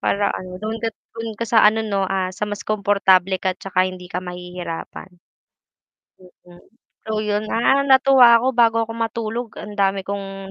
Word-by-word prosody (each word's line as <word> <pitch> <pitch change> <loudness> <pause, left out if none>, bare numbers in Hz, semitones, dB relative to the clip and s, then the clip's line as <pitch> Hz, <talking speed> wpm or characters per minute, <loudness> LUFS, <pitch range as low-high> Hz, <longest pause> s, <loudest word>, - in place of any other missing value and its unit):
Para 200 0 0
ano 185 0 -7
dun 215 +1 -3
ka 230 - -1 0.2
dun 230 -1 -6
ka 230 - -3
sa 230 -1 +4
ano 220 +1 0
no, 200 -2 -1
ah, 190 -1 -2
sa 210 +2 -4
mas 205 0 -6
komportable 195 -3 +2
ka 185 0 -1
at 185 - -23
tsaka 185 -1 0
hindi 180 -1 -10
ka 180 - -4
mahihirapan. 180 -1 -7 1.4
Mm. 175 0 -17 0.4
So 215 -1 -2
yun, 210 0 -1
ah, 265 +4 +3
natuwa 265 -3 +6
ako - - -1
bago 230 -1 +4
ako 225 0 -5
matulog 230 +1 -3
ang 210 0 -9
dami 195 0 +1
kong 195 0 -6
205 Hz, 175 wpm, -21 LUFS, 190-225 Hz, 1.4 s, natuwa